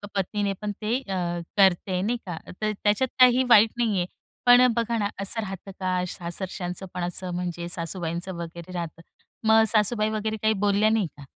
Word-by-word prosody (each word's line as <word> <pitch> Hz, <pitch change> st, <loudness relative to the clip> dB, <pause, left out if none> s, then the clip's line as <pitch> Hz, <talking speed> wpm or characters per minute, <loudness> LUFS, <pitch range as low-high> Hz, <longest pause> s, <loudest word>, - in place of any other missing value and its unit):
पत्नीने 200 Hz, +1 st, -1 dB
पण 210 Hz, -1 st, -2 dB
ते 220 Hz, +3 st, 0 dB
अ, 195 Hz, -6 st, -5 dB, 0.4 s
करते 190 Hz, -1 st, +4 dB
आहे 180 Hz, 0 st, 0 dB
नाही 235 Hz, +5 st, 0 dB
का. 175 Hz, -4 st, -5 dB, 0.2 s
तर 215 Hz, 0 st, +1 dB
त्याच्यात 210 Hz, +5 st, +3 dB
काही 255 Hz, 0 st, +7 dB
वाईट 220 Hz, -1 st, +7 dB
नाही 225 Hz, -4 st, +1 dB
आहे. 175 Hz, -, +1 dB, 0.4 s
पण 245 Hz, +1 st, +8 dB
बघा 235 Hz, 0 st, 0 dB
ना, 205 Hz, -2 st, 0 dB
असं 225 Hz, +3 st, -1 dB
राहतं 195 Hz, -1 st, -7 dB
का 185 Hz, -1 st, 0 dB
सासरच्यांचं 180 Hz, +1 st, -5 dB
पण, 180 Hz, -1 st, -3 dB
असं 180 Hz, +1 st, -3 dB
म्हणजे 175 Hz, -1 st, -4 dB
सासूबाईंचं 170 Hz, +1 st, -4 dB
वगैरे 170 Hz, +1 st, -8 dB
राहतं. 165 Hz, -2 st, -5 dB, 0.5 s
मग 220 Hz, 0 st, +6 dB
सासूबाई 215 Hz, 0 st, +2 dB
वगैरे 220 Hz, 0 st, -2 dB
काही 220 Hz, 0 st, +3 dB
बोलल्या 205 Hz, +2 st, +3 dB
नाही 220 Hz, -5 st, +1 dB
का? 145 Hz, -, -11 dB
200 Hz, 180 wpm, -25 LUFS, 180-220 Hz, 0.5 s, पण